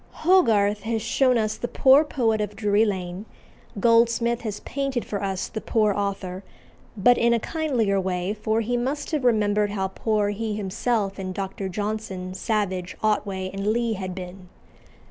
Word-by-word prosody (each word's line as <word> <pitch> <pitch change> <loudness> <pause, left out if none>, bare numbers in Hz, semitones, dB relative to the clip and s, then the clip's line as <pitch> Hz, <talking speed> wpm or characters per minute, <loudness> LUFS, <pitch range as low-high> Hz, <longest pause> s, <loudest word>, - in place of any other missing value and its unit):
Hogarth 210 - +4
has 225 +1 -1
shown 250 +3 +2
us 215 -1 0
the 240 - -3
poor 270 +4 +5
poet 230 -7 0
of 210 0 -4
Drury 210 0 +2
Lane; 190 0 -4 0.5
Goldsmith 235 +1 +3
has 215 -3 -4
painted 275 -3 -3
for 200 - -4
us 195 -2 -2
the 220 - -6
poor 215 -2 +2
author, 195 -2 -3 0.5
but 245 +5 +4
in 235 0 +4
a - - +1
kindlier 235 - 0
way, 185 +1 -2
for 220 +1 -1
he 245 +2 -1
must 275 +6 -2
have 300 -4 -1
remembered 210 -3 +2
how 195 -2 -2
poor 210 +1 0
he 210 +1 -3
himself 205 0 -1
and 185 -1 -5
Dr. 195 0 -4
Johnson, 205 -2 -4
Savage, 190 -3 -2
Otway, 195 -3 0
and 195 +1 -3
Lee 230 +1 +1
had 185 -3 -5
been. 180 0 -9
210 Hz, 165 wpm, -24 LUFS, 195-230 Hz, 0.5 s, poor